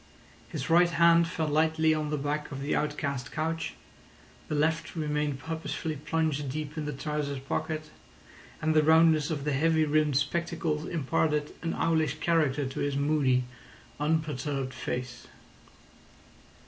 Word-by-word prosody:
His - - -4
right 175 +1 +5
hand 170 0 +5
fell 165 -2 -2
lightly 160 +1 +3
on 155 -1 -2
the 150 - -1
back 145 +1 -2
of 135 - -5
the 145 - 0
outcast 140 -4 -2
couch, 160 +1 -2 0.7
the 150 - -2
left 160 +4 0
remained 150 -3 -1
purposefully 160 +1 -4
plunged 150 -1 -1
deep 150 +2 -4
in 155 -2 -3
the 150 - -2
trousers 145 0 -3
pocket, 155 +3 -3 0.7
and 160 0 +2
the 155 - +5
roundness 160 0 +5
of 150 -4 -2
the 150 0 0
heavy 160 +3 +3
rimmed 150 -2 +2
spectacles 160 0 -1
imparted 150 0 0
an 165 - -2
owlish 160 -2 +1
character 150 -4 +1
to 130 - -5
his 145 -1 -1
moody, 140 -3 +2 0.6
unperturbed 145 -3 -1
face. 125 -1 -5
150 Hz, 140 wpm, -29 LUFS, 145-160 Hz, 0.7 s, right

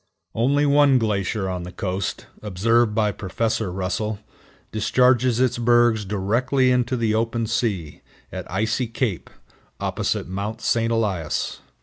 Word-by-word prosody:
Only 140 +6 +2
one 145 -1 +5
glacier 105 -3 -1
on 90 -1 -3
the 90 +1 -7
coast, 95 0 -3 0.2
observed 110 +3 +1
by 105 -1 +2
Prof. 110 +4 -2
Russell, 95 +2 -2 0.5
discharges 125 +2 +3
its 125 -1 +1
bergs 120 -2 +3
directly 120 +7 +1
into 125 0 +1
the 115 -2 +1
open 115 +1 0
sea, 105 -9 -2 0.3
at - - -7
Icy 110 +5 0
Cape, 115 -5 -3 0.5
opposite - - -2
Mount 100 +4 -4
St. 115 0 +1
Elias. 100 -9 -1
110 Hz, 125 wpm, -23 LUFS, 100-120 Hz, 0.5 s, one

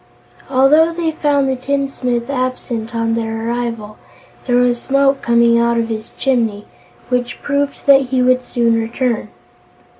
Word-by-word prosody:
Although 290 +5 +4
they 330 -1 -1
found 290 -3 +1
the 265 - 0
tinsmith 255 -2 -2
absent 255 -3 -3
on 230 0 0
their 225 0 -3
arrival, 230 -3 -4 0.5
there 245 - +2
was 245 -1 +2
smoke 275 0 +1
coming 235 0 +3
out 235 0 +1
of 230 0 -1
his 220 0 -5
chimney, 225 -6 0 0.4
which 250 -1 -2
proved 285 0 -2
that 275 -2 +5
he 255 0 +1
would 255 0 +2
soon 230 -2 +1
return. 230 -1 -2
245 Hz, 145 wpm, -17 LUFS, 230-270 Hz, 0.5 s, that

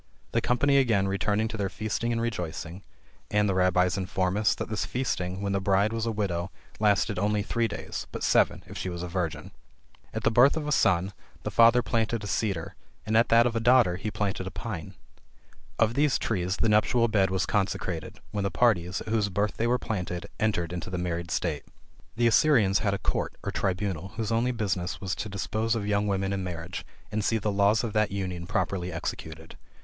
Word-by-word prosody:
The 115 - +1
company 140 +4 +3
again 110 -8 +3
returned 105 +3 0
to 110 - -5
their 100 -2 -1
feasting 110 +3 -2
and 115 - 0
rejoicing; 90 -5 -4 0.5
and 105 0 +2
the 100 - +1
Rabbies 90 0 +2
inform 95 0 -1
us, 105 0 +2
that - - -4
this 110 - -2
feasting, 95 -7 -2
when 100 - -1
the 100 0 0
bride, 100 +3 +2
was 115 0 -2
a - - +1
widow, 95 -5 -2 0.3
lasted 105 -1 +2
only 105 +1 +1
three 115 +2 0
days, 105 - -6
but - - -5
seven - - +3
if - - -11
she 95 - -3
was 85 -1 -5
a - - -3
virgin. 85 -2 -3 0.6
At - - -4
the - - +3
birth 125 +7 +5
of 150 -2 -3
a - - -1
son, 95 -6 +2 0.3
the - - -3
father 115 +1 +6
planted 115 -1 -1
a - - -4
cedar; 100 -6 -2 0.3
and 110 - 0
at 115 +1 +4
that 115 +1 +6
of 120 -1 0
a - - +2
daughter, 115 -6 +4
he 105 +3 -3
planted 100 -3 -2
a - - -2
pine. 95 -4 -6 0.8
Of 115 0 +3
these 145 +1 +2
trees 95 -3 -1
the - - +1
nuptial 115 +3 +3
bed 100 -4 +2
was 95 0 0
constructed, 95 -1 -2
when 100 -1 -2
the 100 - +1
parties, 95 -6 +1
at - - -7
whose 110 -2 +1
birth 100 +2 -1
they 115 - +1
were 125 +1 +3
planted, 90 -7 -4
entered 90 -6 0
into 90 +1 -5
the 90 - -3
married 85 -1 -3
state. 80 -4 -2 0.5
The 120 +1 +1
Assyrians 115 -4 +4
had 100 -2 0
a - - -2
court, - - -2
or - - -2
tribunal 95 -1 -2
whose 110 -2 -2
only 115 +2 +2
business 95 -6 -2
was 95 -2 -3
to 105 - -4
dispose 110 +3 -1
of 105 -3 -2
young 105 0 +1
women 95 0 0
in 95 -1 -2
marriage, 90 0 -6 0.2
and 105 0 -1
see 115 - +2
the 105 -1 -1
laws 100 +3 +3
of 115 -3 -3
that 110 -2 +2
union 90 -3 -4
properly 95 -3 -1
executed. 80 -1 -6
100 Hz, 210 wpm, -27 LUFS, 90-115 Hz, 0.8 s, father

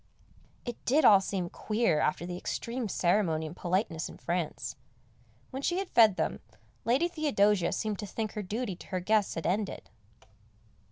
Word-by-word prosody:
It 240 -2 -6
did 295 +5 +3
all 200 -2 +8
seem 190 -2 -2
queer 215 -8 +1
after 160 +3 0
the 180 0 -4
extreme 235 +5 -3
ceremony 175 -4 +1
and 155 +2 -7
politeness 175 -3 -1
in - - -11
France. 160 -8 -3 0.8
When 265 - -4
she 350 +5 0
had 385 -1 -3
fed 220 -4 +6
them, - - -1 0.5
Lady 260 +9 +3
Theodosia 210 - +2
seemed 215 -3 -2
to 205 - -4
think 215 +1 -3
her 210 - -4
duty 210 +1 -3
to - - -13
her 185 -2 -2
guests 210 +2 +1
had 165 - -4
ended. 195 +4 -2
205 Hz, 165 wpm, -30 LUFS, 175-230 Hz, 0.8 s, all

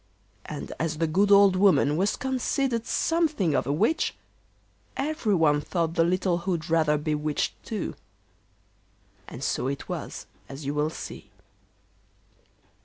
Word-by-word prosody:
And - - -6
as 155 -1 -1
the 165 - +1
good 195 +6 +2
old 200 -1 +7
woman 185 -6 +4
was 195 +5 +1
considered 260 -2 -1
something 310 - +1
of - - 0
a - - +1
witch, 220 - +1 0.8
everyone 200 - +1
thought 165 +1 -1
the 165 -1 +3
little 180 0 +1
hood 170 -2 -3
rather 155 -2 +3
bewitched 150 0 -1
too. 215 -4 -4 1.3
And 125 - -8
so 125 -1 -1
it 140 0 -4
was, - - -5 0.2
as 135 +1 -8
you 140 - -1
will 150 +1 0
see. 105 -9 -9
170 Hz, 130 wpm, -26 LUFS, 150-205 Hz, 1.3 s, old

